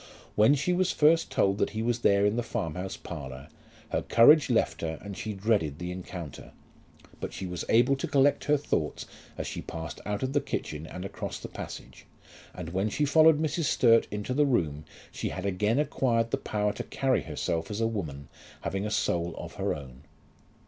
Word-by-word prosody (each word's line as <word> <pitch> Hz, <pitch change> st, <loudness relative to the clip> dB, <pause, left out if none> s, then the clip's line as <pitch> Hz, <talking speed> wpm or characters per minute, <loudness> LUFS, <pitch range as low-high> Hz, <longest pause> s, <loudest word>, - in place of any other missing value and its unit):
When 110 Hz, +7 st, +5 dB
she 145 Hz, +6 st, 0 dB
was 185 Hz, 0 st, +2 dB
first 160 Hz, +2 st, +4 dB
told 100 Hz, +1 st, +1 dB
that -, -, +2 dB
he 110 Hz, -, 0 dB
was 120 Hz, 0 st, 0 dB
there 100 Hz, -3 st, +4 dB
in 105 Hz, +1 st, +2 dB
the 120 Hz, -, +1 dB
farm 80 Hz, -8 st, -3 dB
house 95 Hz, +2 st, -5 dB
parlour, 70 Hz, -3 st, -8 dB, 0.4 s
her -, -, 0 dB
courage 145 Hz, +6 st, +6 dB
left 120 Hz, -, +1 dB
her 80 Hz, -1 st, -3 dB
and 100 Hz, -1 st, -8 dB
she 110 Hz, -, -4 dB
dreaded 100 Hz, -8 st, 0 dB
the 90 Hz, +1 st, -5 dB
encounter; 90 Hz, -4 st, -8 dB, 0.7 s
but -, -, -5 dB
she 95 Hz, -, -5 dB
was 90 Hz, -1 st, -4 dB
able 125 Hz, +4 st, +5 dB
to -, -, -3 dB
collect 140 Hz, -1 st, +3 dB
her 150 Hz, 0 st, +4 dB
thoughts 85 Hz, -, -2 dB, 0.3 s
as -, -, -3 dB
she -, -, -4 dB
passed 80 Hz, 0 st, -7 dB
out 105 Hz, +3 st, -3 dB
of 130 Hz, +1 st, -1 dB
the 145 Hz, -, +3 dB
kitchen, 75 Hz, +1 st, -4 dB
and 90 Hz, +3 st, -7 dB
across 95 Hz, -, -5 dB
the -, -, -7 dB
passage, -, -, -9 dB, 0.4 s
and 85 Hz, -3 st, -7 dB
when 95 Hz, +4 st, 0 dB
she 145 Hz, +7 st, 0 dB
followed 155 Hz, +1 st, +6 dB
Mrs. 155 Hz, +1 st, 0 dB
Sturt 115 Hz, -4 st, +4 dB
into 105 Hz, +4 st, -3 dB
the 145 Hz, +2 st, +3 dB
room 80 Hz, -, 0 dB, 0.3 s
she -, -, -3 dB
had 95 Hz, -, -5 dB
again 105 Hz, +4 st, +1 dB
acquired 115 Hz, -6 st, +1 dB
the -, -, +1 dB
power 105 Hz, -1 st, -1 dB
to -, -, -5 dB
carry 135 Hz, -1 st, 0 dB
herself 80 Hz, -1 st, -3 dB
as 105 Hz, 0 st, -4 dB
a 115 Hz, -, +2 dB
woman 80 Hz, -11 st, -4 dB, 0.3 s
having 95 Hz, +2 st, -2 dB
a -, -, -3 dB
soul 85 Hz, -5 st, 0 dB
of -, -, -7 dB
her -, -, 0 dB
own. 65 Hz, -3 st, -10 dB
105 Hz, 200 wpm, -28 LUFS, 85-130 Hz, 0.7 s, courage